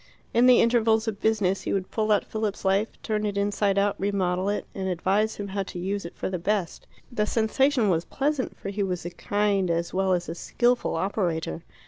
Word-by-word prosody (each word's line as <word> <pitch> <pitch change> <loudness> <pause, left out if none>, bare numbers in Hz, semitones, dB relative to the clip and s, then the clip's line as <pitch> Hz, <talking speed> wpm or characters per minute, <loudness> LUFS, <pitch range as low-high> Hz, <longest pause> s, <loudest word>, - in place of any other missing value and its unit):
In 240 +2 +5
the 250 -1 +7
intervals 225 -1 +3
of 210 -2 -3
business 205 -4 +1
he - - -2
would 190 -1 -2
pull 215 -1 0
out 210 - +3
Philip's 215 -3 -3
life, 195 +3 +3 0.2
turn 215 -1 -1
it 205 -1 -2
inside 200 0 +1
out, 200 0 +2
remodel 190 -1 0
it, 205 - -2
and 190 -1 -3
advise 195 +5 +1
him 200 -1 -5
how 195 +1 -2
to 185 - -6
use 195 +2 -3
it 170 - -8
for - - -3
the 185 -1 -3
best. 195 -1 -2 0.2
The 210 -3 0
sensation 240 +2 +2
was 170 -3 +2
pleasant, 280 +3 -2
for - - -6
he 200 +1 -3
was 180 -3 -2
a 175 - -4
kind 205 -1 0
as 170 0 -1
well 190 0 +2
as 175 -1 -1
a 165 - -3
skilful 240 +7 0
operator. 165 - -1
200 Hz, 210 wpm, -26 LUFS, 185-220 Hz, 0.2 s, the